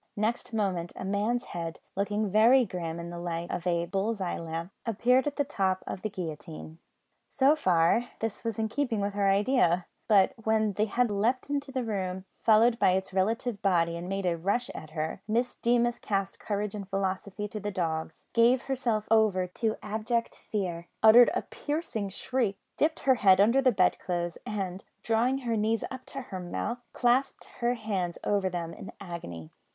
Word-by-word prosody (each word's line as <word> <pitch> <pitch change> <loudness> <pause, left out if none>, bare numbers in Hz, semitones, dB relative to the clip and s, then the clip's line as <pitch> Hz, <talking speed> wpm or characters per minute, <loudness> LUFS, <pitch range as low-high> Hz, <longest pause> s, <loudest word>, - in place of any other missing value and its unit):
Next 220 +4 -1
moment 190 -6 -1
a - - -6
man's 210 +5 0
head, 165 -1 -5 0.2
looking 205 +1 -1
very 235 +5 +6
grim 170 -4 -4
in 170 0 -6
the 175 - -6
light 170 0 -4
of 180 +1 -3
a 170 -1 +1
bull's 195 +5 -1
eye 185 -2 -2
lamp, 165 +2 -5
appeared 245 +4 +2
at 290 - -2
the 285 - +1
top 190 -9 -1
of 185 - -5
the 215 - -2
guillotine. 160 -3 -7 0.5
So 280 +2 +4
far 185 - +2
this 225 -2 -3
was 230 -3 -2
in 220 -1 0
keeping 240 -1 -1
with 200 0 -1
her 200 -1 +2
idea; 195 -4 +3 0.2
but 200 -4 +5
when 220 -1 +2
the 210 +3 +1
head 235 +1 +1
leapt 240 +7 0
into 285 -1 -2
the 260 -1 -1
room, 190 -4 -3 0.2
followed 230 +2 +5
by 185 - +4
its 190 0 -2
relative 220 +3 0
body, 170 -4 +2
and 175 +2 -6
made 195 0 -2
a 170 -2 0
rush 205 +8 0
at 155 - -9
her, 160 +3 -4
Miss 235 +3 0
Deemas 240 0 +2
cast 195 -1 -2
courage 205 -1 -2
and 200 -2 -6
philosophy 195 +1 -2
to 215 - -5
the 205 0 -3
dogs, 160 -4 -3
gave 240 +2 +4
herself 240 -6 -1
over 215 -5 +4
to 215 +5 -2
abject 220 +3 -1
fear, 175 -5 -4 0.2
uttered 235 +2 +9
a - - 0
piercing 290 -9 -3
shriek, 215 +1 -1 0.2
dipped 315 +1 +1
her 265 - +5
head 190 -2 +6
under 230 +7 +5
the 260 -1 +4
bedclothes, 180 -3 0
and, 190 -3 -3 0.2
drawing 235 +4 +2
her 230 -1 +1
knees 220 +1 +1
up 260 -1 -8
to 275 - -6
her 190 -5 -6
mouth, 180 +7 -3
clasped 250 +3 +1
her 240 +1 +1
hands 195 -6 -2
over 200 -2 +1
them 170 -2 -4
in - - -9
agony. 125 - -7
205 Hz, 185 wpm, -29 LUFS, 180-235 Hz, 0.5 s, uttered